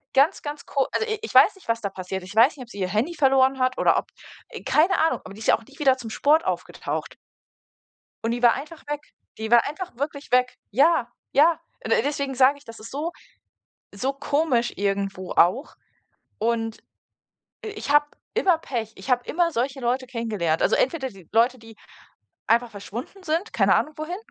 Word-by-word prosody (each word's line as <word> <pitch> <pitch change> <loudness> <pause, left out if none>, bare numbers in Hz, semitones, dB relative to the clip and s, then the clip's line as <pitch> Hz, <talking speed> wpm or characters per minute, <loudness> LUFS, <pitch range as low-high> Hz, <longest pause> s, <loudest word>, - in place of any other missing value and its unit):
Ganz, 285 +8 +4
ganz 290 -1 -6
ko 275 -1 0
also, 445 - 0
i 435 - -2
ich 450 - -6
weiß - - +8
nicht 385 - -19
was 230 0 0
da 200 - -2
passiert, 190 0 -6
ich 195 +3 -10
weiß 250 +6 +5
nicht, 255 - -7
ob 240 - -16
sie 205 - -10
ihr 185 - 0
Handy 220 - 0
verloren 265 -2 +3
hat, 255 0 +1
oder - - +3
ob - - -9 0.4
äh, - - -9
keine 350 +5 +3
Ahnung. - - 0
Aber 190 - -9
die - - -12
ist - - -4
ja - - +6
auch - - -17
nie 280 - -18
wieder 265 -3 +4
zum 230 -3 -7
Sport 310 +7 +3
aufgetaucht. - - -4 1.1
Und 225 - +1
die 240 +1 -2
war 240 - +6
einfach 305 +3 -9
weg. 295 0 -4 0.4
Die 220 0 -4
war 235 -1 +6
einfach 350 0 -7
wirklich 285 -1 -5
weg. 250 0 +3
Ja! 265 0 +3 0.2
Ja! 320 +3 +4 0.3
D - - -4
deswegen 280 -1 -2
sage 265 +3 +5
ich, 285 - -21
das 230 -1 -11
ist 225 - -10
so 310 +5 -3 0.8
so 260 +7 -1
komisch 275 -3 0
irgendwo 195 -2 -2
auch, 225 - +2 0.6
und, 225 0 -1 0.9
i 435 - -4
ich 410 - -6
habe 295 0 +5 0.3
immer 385 -7 +3
Pech. 230 -8 -4
Ich 265 - -8
habe 245 -1 +2
immer 345 +1 +1
solche 265 0 -2
Leute 250 +2 -1
kennengelernt. 215 -10 -1
Also - - +3
entweder 265 -1 0
die 190 -7 -16
Leute, 240 +3 +3
die 225 0 -14 0.7
einfach 235 +1 +3
verschwunden 235 - -8
sind, 330 +6 -1
keine - - +4
Ahnung 305 - 0
wohin. 330 +4 -4
260 Hz, 200 wpm, -24 LUFS, 225-295 Hz, 1.1 s, weiß